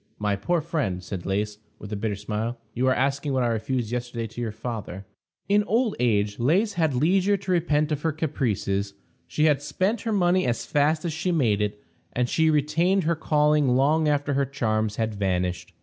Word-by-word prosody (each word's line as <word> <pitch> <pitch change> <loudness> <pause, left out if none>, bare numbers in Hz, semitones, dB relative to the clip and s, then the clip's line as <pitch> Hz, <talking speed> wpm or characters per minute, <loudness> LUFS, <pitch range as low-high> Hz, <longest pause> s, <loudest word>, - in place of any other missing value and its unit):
"My 105 -1 0
poor 165 - 0
friend," 140 - -2
said 90 -1 -6
Lais, 105 +2 -1 0.2
with 105 0 -8
a - - -1
bitter 105 0 -2
smile, 110 +4 -3 0.2
"you 130 +2 0
are 130 - +4
asking 140 +2 0
what 130 -1 +1
I - - +2
refused 115 +1 -2
yesterday 120 -1 -3
to 115 +2 -7
your 115 -2 -2
father." 110 -4 -6 0.4
In 205 +1 +3
old 230 +1 +1
age 105 -3 +1
Lais 185 - +2
had 160 -7 +1
leisure 190 +8 +3
to 190 -1 -5
repent 155 -3 +1
of 150 -1 -1
her 160 - +1
caprices. 105 - -2 0.3
She 150 - -1
had 150 -3 +3
spent 185 +9 -1
her 225 - -2
money 185 -5 +2
as 120 - -1
fast 155 +3 +1
as 165 - -1
she 175 +3 -1
made 115 -11 +2
it, 105 0 -3 0.3
and 125 0 +1
she 160 +5 +2
retained 160 +6 +2
her 165 +2 +1
calling 150 -4 +2
long 150 +4 +3
after 145 -1 +1
her 140 0 +1
charms 110 -5 -1
had 110 -1 -1
vanished. 90 -3 -2
135 Hz, 195 wpm, -25 LUFS, 110-160 Hz, 0.4 s, are